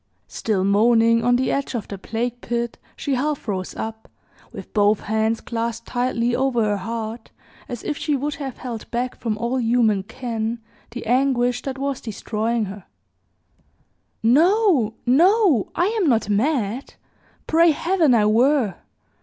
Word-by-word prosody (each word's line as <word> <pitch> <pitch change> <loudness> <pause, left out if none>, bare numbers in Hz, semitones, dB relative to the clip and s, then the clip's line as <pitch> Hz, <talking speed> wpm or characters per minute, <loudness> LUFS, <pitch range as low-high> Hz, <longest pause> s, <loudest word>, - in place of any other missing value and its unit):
Still 205 -4 -1
moaning 230 +3 +4
on 245 +1 +4
the 255 +1 +1
edge 275 -2 -2
of 225 - -4
the 200 - -7
plague 235 +4 -3
pit, 235 0 -3 0.2
she 280 - -2
half 280 +1 -1
rose 185 -3 -3
up, 220 0 -6 0.4
with - - -10
both 205 -1 +3
hands 220 +1 0
clasped 230 0 -4
tightly 245 -1 0
over 260 -3 +1
her 205 -1 +1
heart, 225 +3 -5 0.4
as 245 -3 -6
if 295 - -3
she 300 -2 0
would 290 +2 -2
have 270 -4 -6
held 235 -4 -7
back 245 +1 -2
from 220 -3 -3
all 235 +3 -1
human 225 -4 +2
ken 225 +1 -4 0.3
the 240 +1 -7
anguish 245 0 +2
that 270 -1 -5
was 275 -1 -3
destroying 220 +1 -2
her, 195 -1 -9 1.4
"NO 310 - +3
no! 335 - +4
I 350 - +2 0.2
am 340 - +3
not 225 -4 +1
mad 235 +2 -1 0.5
pray 335 +1 +4
Heaven 325 -3 +2
I 215 -2 +3
were! 230 -1 +3
235 Hz, 150 wpm, -22 LUFS, 220-265 Hz, 1.4 s, moaning